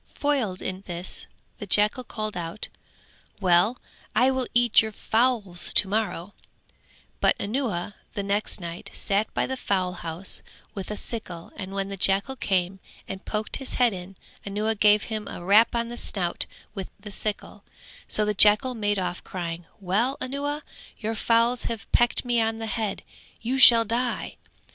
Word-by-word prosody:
Foiled 260 Hz, -11 st, 0 dB
in 185 Hz, 0 st, -4 dB
this 175 Hz, 0 st, -3 dB, 0.3 s
the 205 Hz, -, -6 dB
jackal 210 Hz, +6 st, +2 dB
called 215 Hz, -3 st, -4 dB
out 170 Hz, +4 st, -5 dB, 0.7 s
"Well, 190 Hz, +5 st, +3 dB, 0.4 s
I 250 Hz, +4 st, +4 dB
will 260 Hz, -1 st, -1 dB
eat 240 Hz, -2 st, +6 dB
your 220 Hz, -1 st, -4 dB
fowls 220 Hz, -5 st, +1 dB
to 205 Hz, -, +6 dB
morrow;" 205 Hz, -2 st, -2 dB, 0.9 s
but -, -, +3 dB
Anuwa 205 Hz, -5 st, -2 dB, 0.2 s
the 200 Hz, -, -2 dB
next 200 Hz, +2 st, -1 dB
night 170 Hz, -1 st, -7 dB
sat 205 Hz, +2 st, 0 dB
by -, -, +1 dB
the 265 Hz, -, -3 dB
fowl 185 Hz, -7 st, -1 dB
house 170 Hz, +1 st, 0 dB, 0.3 s
with 195 Hz, -3 st, -6 dB
a 210 Hz, -, -3 dB
sickle 190 Hz, -7 st, -3 dB
and 190 Hz, 0 st, -7 dB
when 195 Hz, 0 st, -2 dB
the 195 Hz, -, -5 dB
jackal 195 Hz, +7 st, +2 dB
came 190 Hz, -5 st, -1 dB, 0.3 s
and 190 Hz, +1 st, -7 dB
poked 215 Hz, 0 st, -2 dB
in -, -, -13 dB
his 270 Hz, -, -4 dB
head, 195 Hz, -6 st, 0 dB, 0.3 s
Anuwa 210 Hz, +2 st, -1 dB
gave 210 Hz, 0 st, +4 dB
him 215 Hz, -2 st, -4 dB
a 175 Hz, -, -7 dB
rap 215 Hz, +5 st, +5 dB
on 235 Hz, 0 st, -1 dB
the 240 Hz, -, -7 dB
snout 180 Hz, -7 st, -2 dB, 0.3 s
with 195 Hz, -3 st, -6 dB
the 210 Hz, 0 st, -9 dB
sickle, 210 Hz, +1 st, -4 dB, 0.4 s
so 215 Hz, -, +2 dB
the 210 Hz, -, 0 dB
jackal 210 Hz, +6 st, +6 dB
made 205 Hz, -3 st, 0 dB
off 180 Hz, -2 st, -3 dB
crying 170 Hz, -2 st, -5 dB
"Well, 215 Hz, +8 st, 0 dB
Anuwa, 285 Hz, +3 st, -3 dB, 0.3 s
your 220 Hz, 0 st, -3 dB
fowls 230 Hz, +2 st, +2 dB
have 230 Hz, -2 st, -4 dB
pecked 240 Hz, +1 st, +3 dB
me 240 Hz, -1 st, +2 dB
on 225 Hz, 0 st, 0 dB
the 225 Hz, -, -4 dB
head, 220 Hz, -2 st, -2 dB, 0.4 s
you 255 Hz, +4 st, -1 dB
shall 230 Hz, -3 st, +9 dB
die." 235 Hz, +2 st, -2 dB
210 Hz, 165 wpm, -25 LUFS, 190-235 Hz, 0.9 s, shall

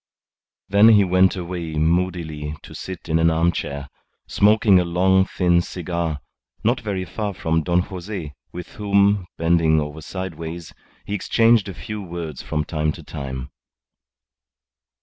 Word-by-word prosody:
Then 100 Hz, +3 st, +6 dB
he 105 Hz, -3 st, +6 dB
went 95 Hz, 0 st, +3 dB
away 85 Hz, -3 st, -5 dB
moodily 80 Hz, -2 st, -1 dB
to -, -, -11 dB
sit 95 Hz, -2 st, -8 dB
in 80 Hz, 0 st, +1 dB
an 80 Hz, 0 st, +4 dB
armchair, 80 Hz, -4 st, -1 dB, 0.4 s
smoking 105 Hz, -2 st, +4 dB
a -, -, +2 dB
long, 95 Hz, +2 st, +3 dB
thin 90 Hz, -3 st, +2 dB
cigar, 85 Hz, -4 st, -3 dB, 0.4 s
not 120 Hz, +3 st, +1 dB
very 100 Hz, -4 st, -3 dB
far 100 Hz, +2 st, -4 dB
from 80 Hz, 0 st, 0 dB
Don 90 Hz, +2 st, +2 dB
Jose, 90 Hz, -4 st, -6 dB, 0.2 s
with 90 Hz, 0 st, -8 dB
whom, 100 Hz, -2 st, +2 dB
bending 80 Hz, -1 st, +3 dB
over 75 Hz, +1 st, -5 dB
sideways, 85 Hz, -2 st, -6 dB, 0.3 s
he 100 Hz, -, -5 dB
exchanged 115 Hz, +1 st, +3 dB
a 95 Hz, -, -7 dB
few 105 Hz, +1 st, -6 dB
words 85 Hz, -5 st, -6 dB
from 75 Hz, -1 st, -2 dB
time 75 Hz, -1 st, -1 dB
to -, -, -11 dB
time. 65 Hz, -2 st, -6 dB
85 Hz, 140 wpm, -22 LUFS, 80-95 Hz, 0.4 s, Then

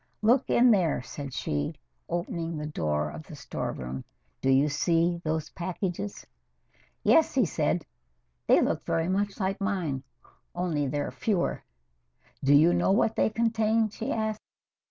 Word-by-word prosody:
"Look 245 Hz, +5 st, +4 dB
in 245 Hz, 0 st, +6 dB
there," 175 Hz, -, +2 dB
said 140 Hz, 0 st, -7 dB
she, 75 Hz, -10 st, -2 dB, 0.3 s
opening 170 Hz, -1 st, -3 dB
the 150 Hz, -, -4 dB
door 75 Hz, -, -1 dB
of 75 Hz, +2 st, -9 dB
the -, -, -9 dB
storeroom. 65 Hz, +1 st, -5 dB, 0.4 s
"Do 135 Hz, -, +1 dB
you 135 Hz, +2 st, +5 dB
see 170 Hz, +3 st, +1 dB
those 155 Hz, -1 st, -2 dB
packages?" 185 Hz, +2 st, -4 dB, 0.8 s
"Yes," 320 Hz, -3 st, +4 dB
he 255 Hz, -5 st, +4 dB
said. 155 Hz, 0 st, 0 dB, 0.6 s
"They -, -, +6 dB
look -, -, 0 dB
very 165 Hz, 0 st, 0 dB
much 200 Hz, +2 st, -1 dB
like 195 Hz, +1 st, -1 dB
mine, 180 Hz, -10 st, -1 dB, 0.5 s
only 165 Hz, -5 st, 0 dB
they're 145 Hz, +2 st, -2 dB
fewer." 200 Hz, -6 st, -1 dB, 0.8 s
"Do 140 Hz, +1 st, +5 dB
you 160 Hz, +4 st, +6 dB
know -, -, +2 dB
what 220 Hz, +2 st, +2 dB
they -, -, +3 dB
contain?" 225 Hz, 0 st, +1 dB
she 220 Hz, +2 st, -4 dB
asked. 220 Hz, -1 st, -1 dB
175 Hz, 145 wpm, -28 LUFS, 145-210 Hz, 0.8 s, in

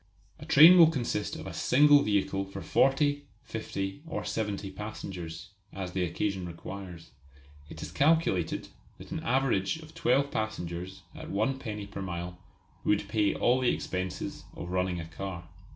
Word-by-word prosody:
A -, -, -10 dB
train 170 Hz, +5 st, +9 dB
will 165 Hz, -2 st, +9 dB
consist 120 Hz, -8 st, -2 dB
of -, -, -8 dB
a -, -, -6 dB
single 145 Hz, +2 st, +5 dB
vehicle 100 Hz, -3 st, +1 dB
for 95 Hz, -1 st, -8 dB
forty, 145 Hz, -, +2 dB, 0.2 s
fifty, 100 Hz, 0 st, -4 dB
or -, -, -4 dB
seventy 105 Hz, -3 st, -3 dB
passengers, 95 Hz, -4 st, -7 dB, 0.2 s
as 95 Hz, -2 st, -5 dB
the 95 Hz, 0 st, -1 dB
occasion 95 Hz, +2 st, -2 dB
requires. 85 Hz, 0 st, -9 dB, 0.6 s
It -, -, -8 dB
is -, -, -7 dB
calculated 145 Hz, -, +1 dB, 0.3 s
that -, -, -12 dB
an -, -, -2 dB
average 125 Hz, -2 st, +1 dB
of 160 Hz, -1 st, -13 dB
twelve 140 Hz, +3 st, +2 dB
passengers 95 Hz, -3 st, -4 dB
at -, -, -9 dB
one 110 Hz, +7 st, 0 dB
penny 105 Hz, -5 st, -5 dB
per 100 Hz, 0 st, -7 dB
mile 90 Hz, -1 st, -5 dB, 0.4 s
would 105 Hz, -, +1 dB
pay 105 Hz, -2 st, +2 dB
all 125 Hz, +2 st, +3 dB
the 125 Hz, -, +2 dB
expenses 90 Hz, 0 st, -3 dB
of 85 Hz, -, -6 dB
running 90 Hz, -1 st, 0 dB
a 85 Hz, -, -5 dB
car. 85 Hz, 0 st, -7 dB
100 Hz, 155 wpm, -29 LUFS, 90-130 Hz, 0.6 s, train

